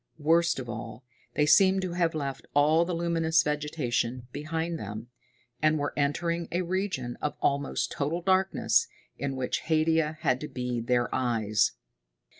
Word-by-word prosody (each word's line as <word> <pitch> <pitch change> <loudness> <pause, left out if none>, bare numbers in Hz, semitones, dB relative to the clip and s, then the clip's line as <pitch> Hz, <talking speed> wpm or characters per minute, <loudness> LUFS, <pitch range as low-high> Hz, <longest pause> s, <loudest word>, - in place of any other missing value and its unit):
Worst 165 +2 +3
of 130 -2 -5
all, 115 +1 -7 0.3
they 150 - +3
seemed 190 +4 +5
to 185 - -2
have 170 -2 +1
left 140 -3 -4
all 155 +3 +4
the 175 0 -2
luminous 165 -1 +2
vegetation 130 -5 -2
behind 160 +3 -3
them, 105 +3 -7 0.5
and 155 0 +3
were 145 -1 -2
entering 170 +4 0
a 180 +2 0
region 180 -9 -2
of 150 - -2
almost 140 0 0
total 160 +5 -2
darkness, 185 -11 +2 0.3
in 140 -1 -2
which 130 -1 -1
Haidia 160 -1 +2
had 130 -3 +2
to 150 - -4
be 125 -3 -3
their 120 0 0
eyes. 110 -4 +1
150 Hz, 150 wpm, -28 LUFS, 125-170 Hz, 0.5 s, seemed